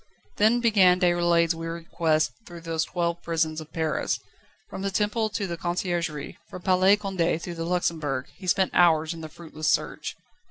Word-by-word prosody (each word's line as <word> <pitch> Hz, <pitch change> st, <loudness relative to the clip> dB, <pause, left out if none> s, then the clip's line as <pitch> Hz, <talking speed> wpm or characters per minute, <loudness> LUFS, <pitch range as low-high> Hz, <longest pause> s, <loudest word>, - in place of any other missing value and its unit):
Then 225 Hz, +3 st, +4 dB
began 195 Hz, -6 st, +5 dB
Déroulède's 175 Hz, -2 st, +3 dB
weary 165 Hz, 0 st, -6 dB
quest 155 Hz, -2 st, +2 dB, 0.2 s
through 175 Hz, -1 st, -10 dB
those 165 Hz, -1 st, -1 dB
twelve 170 Hz, -1 st, -2 dB
prisons 160 Hz, -1 st, -1 dB
of 155 Hz, 0 st, -12 dB
Paris. 160 Hz, -2 st, -1 dB, 0.5 s
From -, -, -7 dB
the 195 Hz, -, -1 dB
Temple 210 Hz, +2 st, 0 dB
to 205 Hz, -1 st, -2 dB
the 170 Hz, -2 st, -4 dB
Conciergerie, 175 Hz, -4 st, -3 dB
from 180 Hz, -, -9 dB
Palais 190 Hz, +2 st, +4 dB
Condé 185 Hz, -5 st, -1 dB
to 175 Hz, -, -5 dB
the 165 Hz, -1 st, -4 dB
Luxembourg, 160 Hz, -6 st, -1 dB
he 185 Hz, -, -10 dB
spent 190 Hz, +1 st, +2 dB
hours 160 Hz, -2 st, +4 dB
in 165 Hz, -, -9 dB
the 155 Hz, -, -7 dB
fruitless 155 Hz, -1 st, -6 dB
search. -, -, 0 dB
170 Hz, 170 wpm, -26 LUFS, 160-185 Hz, 0.5 s, began